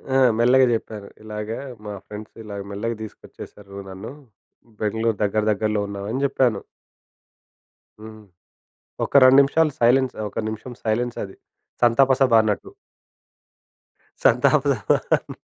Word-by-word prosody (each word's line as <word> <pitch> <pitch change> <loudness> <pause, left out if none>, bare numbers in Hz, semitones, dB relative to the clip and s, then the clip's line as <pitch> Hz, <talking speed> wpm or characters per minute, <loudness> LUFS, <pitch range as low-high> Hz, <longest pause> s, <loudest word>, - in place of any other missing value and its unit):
ఆ - - +5 0.2
మెల్లగా 130 +2 +5
జెప్పాను 110 -2 -5 0.2
ఇలాగ 105 0 -6 0.4
మా 105 - -5
ఫ్రెండ్స్ 105 0 -10
ఇలా 105 -1 -8 0.2
మెల్లగా 115 +4 -3
తీసుకొచ్చేసారు 100 -1 -12
నన్ను, 95 +6 -8 0.7
బెంగుళూరు 110 0 0
దగ్గర 105 +1 0
దగ్గరలో 105 0 0
ఉన్నాం 100 0 -6
అని 130 - -2
జెప్పాను. 125 -6 +1 1.4
హ్మ్. 110 0 -11 0.8
ఒక్క - - -5
2 130 +1 +7
నిమిషాలు 155 +3 +2
సైలెన్స్, 125 +2 +3
ఒక్క 100 - -6
నిమిషం 110 +3 -7
సైలెన్స్ 120 +2 -1
అది. 95 - -13 0.5
సంతాపసభ 130 +2 +4
అన్నట్టు. 110 - -2 1.5
సంతాప - - +4
సభ. - - 0
110 Hz, 110 wpm, -22 LUFS, 105-125 Hz, 1.5 s, 2